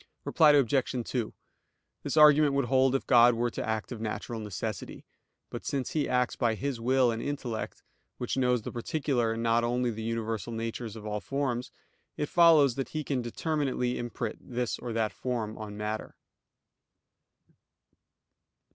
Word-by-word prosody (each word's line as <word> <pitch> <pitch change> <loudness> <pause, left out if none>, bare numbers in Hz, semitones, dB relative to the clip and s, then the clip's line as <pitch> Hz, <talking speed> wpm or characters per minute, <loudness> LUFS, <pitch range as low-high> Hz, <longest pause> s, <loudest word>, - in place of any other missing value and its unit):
Reply 150 -2 +5
Obj. 135 -2 +2
2: 120 -4 -2 0.7
This - - -3
argument 150 -1 +7
would 140 - +2
hold 130 +1 +3
if 135 - -1
God 120 -1 +6
were 120 +1 0
to - - -4
act 110 +1 -3
of 115 -3 -6
natural 115 +1 -4
necessity. 105 -1 -5 0.5
But - - -6
since 135 -2 -2
He 150 -2 0
acts 125 -1 +1
by 115 -3 +1
His 135 +1 -3
will 130 0 +3
and 115 0 -3
intellect, 130 -6 -4 0.3
which 125 - -3
knows 125 -3 +1
the - - -5
particular 120 -2 -1
and 115 +1 -4
not 115 0 +3
only 120 +1 0
the 110 0 -6
universal 115 -1 -3
natures 115 0 -4
of 110 -1 -9
all 105 0 -2
forms, 125 +1 -2 0.5
it 150 - -2
follows 160 -6 +6
that 135 - -3
He 155 -1 -3
can 135 -3 -1
determinately 130 0 -1
imprint 120 -2 -4
this 120 -1 -3
or 120 - -5
that 110 -2 0
form 115 -4 -3
on 105 -1 -7
matter. 105 +1 -4
120 Hz, 160 wpm, -29 LUFS, 115-135 Hz, 0.7 s, argument